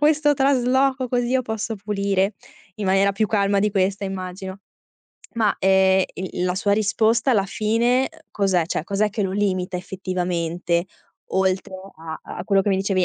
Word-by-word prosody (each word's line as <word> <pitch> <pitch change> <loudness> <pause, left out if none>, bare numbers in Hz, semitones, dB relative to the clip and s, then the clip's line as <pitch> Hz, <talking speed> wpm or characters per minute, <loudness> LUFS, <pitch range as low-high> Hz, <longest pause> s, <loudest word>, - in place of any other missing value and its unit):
questo 295 0 +3
trasloco 265 -1 +2
così 245 0 0
io 255 0 +2
posso 220 0 -3
pulire?" 200 0 0 0.4
In 210 - -3
maniera 195 +1 +3
più 215 +2 +1
calma 200 -1 +1
di 210 +1 +2
questa 195 0 0
immagino. 190 0 -6 0.8
Ma, 220 -3 +2
ehm, 190 0 +4
il 185 0 -4
il 180 - -1
la 180 0 0
sua 200 +1 +1
risposta 225 +4 +2
alla 200 -4 +3
fine, 230 +6 +1
uhm, - - -17
cos'è? 190 -5 +1
Cioè 155 - -2
cos'è 205 +2 0
che 210 - -2
lo 190 -1 -1
limita 185 -3 -1
effettivamente, 175 -2 -2 0.4
oltre 190 0 0 0.2
a 160 0 -7 0.2
a - - -5
quello 195 -1 +3
che 205 - 0
mi 190 - +2
dicevi 190 -1 +1
195 Hz, 170 wpm, -22 LUFS, 190-220 Hz, 0.8 s, ehm